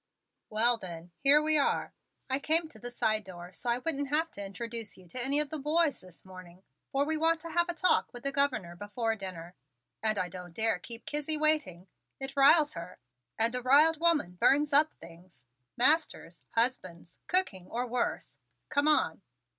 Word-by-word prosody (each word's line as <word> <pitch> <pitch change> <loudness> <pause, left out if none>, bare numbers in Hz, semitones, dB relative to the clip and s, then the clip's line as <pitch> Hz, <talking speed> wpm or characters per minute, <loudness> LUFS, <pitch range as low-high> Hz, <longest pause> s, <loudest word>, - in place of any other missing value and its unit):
"Well, 230 +2 +1
then, 175 -2 -9
here 285 +2 +4
we 310 -1 +4
are. 280 - -1 0.3
I 265 0 0
came 320 +3 +3
to 220 - -16
the 245 - -7
side 215 -3 0
door 180 -1 -11
so 240 - -5
I 235 - +2
wouldn't 285 +1 -2
have 315 +3 0
to 200 - -8
introduce 230 +2 -6
you 185 -1 -17
to 245 +8 -1
any 280 +3 +4
of 300 -2 -1
the 310 - -4
boys 305 +2 +1
this 185 -1 -17
morning, 185 -1 -14 0.3
for 275 +1 +1
we 315 +1 -1
want 325 +1 +2
to 335 0 -8
have 345 +2 0
a 345 - -2
talk 365 +1 +3
with 245 -1 -10
the 275 - -2
Governor 260 -11 0
before 220 +4 -3
dinner 180 -4 -8 0.5
and 215 -1 +1
I 180 - 0
don't 180 -2 -10
dare 225 -4 +2
keep 230 +4 -9
Kizzie 300 +1 -1
waiting. 300 - 0 0.3
It 270 +1 -4
riles 295 +2 +5
her, 170 +1 -9 0.4
and 225 +2 +2
a 250 - -2
riled 295 +5 +4
woman 310 - +1
burns 290 +1 +3
up 305 +2 +5
things: 165 -6 -16 0.3
masters, 260 - +1
husbands, 185 -8 -3
cooking 220 - +1
or 245 +2 -3
worse. 245 0 -3 0.3
Come 290 0 +1
on." 305 - +1
245 Hz, 185 wpm, -29 LUFS, 185-300 Hz, 0.5 s, riles